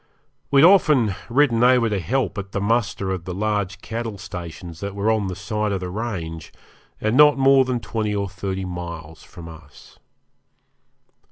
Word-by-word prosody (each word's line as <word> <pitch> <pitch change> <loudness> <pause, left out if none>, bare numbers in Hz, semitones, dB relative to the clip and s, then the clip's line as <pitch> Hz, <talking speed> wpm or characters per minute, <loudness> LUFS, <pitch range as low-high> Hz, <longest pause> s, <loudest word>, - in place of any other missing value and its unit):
We 140 -1 +5
had 165 - +9
often 150 - +4 0.2
ridden 120 -2 +3
over 125 -2 +5
to 105 -3 -1
help 115 +2 -1
at 100 -1 -8
the - - -1
muster 105 -2 0
of 90 -3 -4
the 90 -1 -5
large 105 -1 -2
cattle 115 -2 -5
stations 85 -3 -8
that 100 +1 -5
were 100 +2 +1
on 110 -3 0
the 90 - -4
side 105 +2 -2
of 95 - -1
the 90 -1 -5
range, 90 -7 -5 0.5
and 110 +2 0
not 150 0 +6
more 135 0 +5
than 125 -1 -1
twenty 110 -3 -3
or 100 -1 -1
thirty 95 0 -4
miles 85 -3 -7
from 85 -3 -12
us. 80 -3 -15
100 Hz, 175 wpm, -22 LUFS, 90-115 Hz, 0.5 s, had